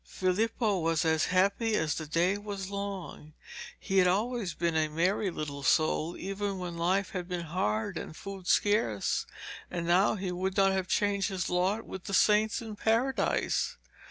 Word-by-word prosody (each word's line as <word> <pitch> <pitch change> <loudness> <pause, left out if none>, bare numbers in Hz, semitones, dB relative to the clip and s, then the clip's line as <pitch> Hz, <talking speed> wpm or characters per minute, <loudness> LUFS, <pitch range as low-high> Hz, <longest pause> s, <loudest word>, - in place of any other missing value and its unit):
Filippo 205 +2 0
was 165 -1 +1
as 160 -1 +2
happy 200 +5 +2
as 160 -6 +1
the 155 -1 -5
day 170 +5 +2
was 200 -2 -6
long. 195 -6 -6 0.5
He 190 0 +1
had 180 - +5
always 210 -1 0
been 170 -1 0
a 155 -1 +2
merry 180 +6 0
little 145 -4 -5
soul 155 +4 +1
even 195 +1 -3
when 180 -2 -5
life 185 +4 0
had 180 -2 -4
been 180 -1 -3
hard 110 - -1
and 155 - -8
food 195 -2 -8
scarce, 205 - +1 0.4
and 170 -1 -3
now 180 +5 +3
he 190 -2 -3
would 185 +2 -2
not 195 -1 +5
have 190 -1 -1
changed 200 +1 +1
his 185 -3 -3
lot 190 +5 +1
with 190 - -8
the 195 - -1
saints 215 +2 +3
in 220 -2 -7
Paradise. 235 +5 0
185 Hz, 170 wpm, -30 LUFS, 170-205 Hz, 0.5 s, had